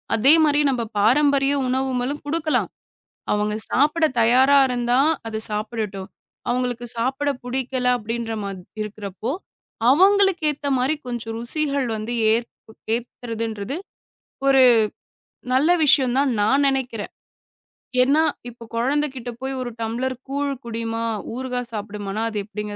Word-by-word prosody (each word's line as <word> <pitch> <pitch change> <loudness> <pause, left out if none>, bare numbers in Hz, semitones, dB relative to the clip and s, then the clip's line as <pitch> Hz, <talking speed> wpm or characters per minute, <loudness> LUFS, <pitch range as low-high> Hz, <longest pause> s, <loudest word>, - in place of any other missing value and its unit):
அதே 265 +7 +6
மாரி 295 -1 +3
நம்ப 250 -3 0
பாரம்பரிய 275 +5 +3
உணவும்மலும் 260 +2 -1
குடுக்கலாம், 310 +1 0 0.6
அவங்க 210 0 0 0.2
சாப்பிட 305 +5 +2 0.2
தயாரா 260 +5 +5
இருந்தா 245 0 +1 0.3
அது 220 -1 -3
சாப்பிடட்டும். 210 -2 -4 0.4
அவுங்களுக்கு 245 -1 -1
சாப்பிட 265 +5 0
பிடிக்கல 255 0 -2
அப்டின்ற 230 +1 -4
மா 200 - -4 0.3
இருக்குறப்போ, 210 +1 -5 0.6
அவங்களுக்கு 385 +2 +4
ஏத்த 290 0 -6
மாதிரி 260 +5 +1
கொஞ்சம் 235 -2 -4
ருசிகள் 280 +2 -1
வந்து 215 +2 -4 0.2
ஏத் 235 +1 0 0.4
ஏத்துறதுன்றது 230 0 -4 0.7
ஒரு 270 -1 +6 0.9
நல்ல 265 +6 +3
விஷயம் 260 -4 +4
தான் 280 0 +3
நான் 270 +7 +3
நெனைக்கிறேன். 255 -5 -2 0.9
ஏன்னா, 280 +5 +4 0.3
இப்போ 235 -1 -13
கொழந்தை 280 +6 +1
கிட்ட 245 -1 -6
போய் 265 0 -3
ஒரு 245 -1 -4
டம்ளர் 240 +4 -2
கூழ் 280 +1 -1
குடிம்மா, 230 0 -3 0.3
ஊறுகா 250 0 -3
சாப்டுமானா 205 -1 -5
அது 215 - -5
எப்டிங்க 210 0 -6
245 Hz, 120 wpm, -22 LUFS, 225-275 Hz, 0.9 s, அதே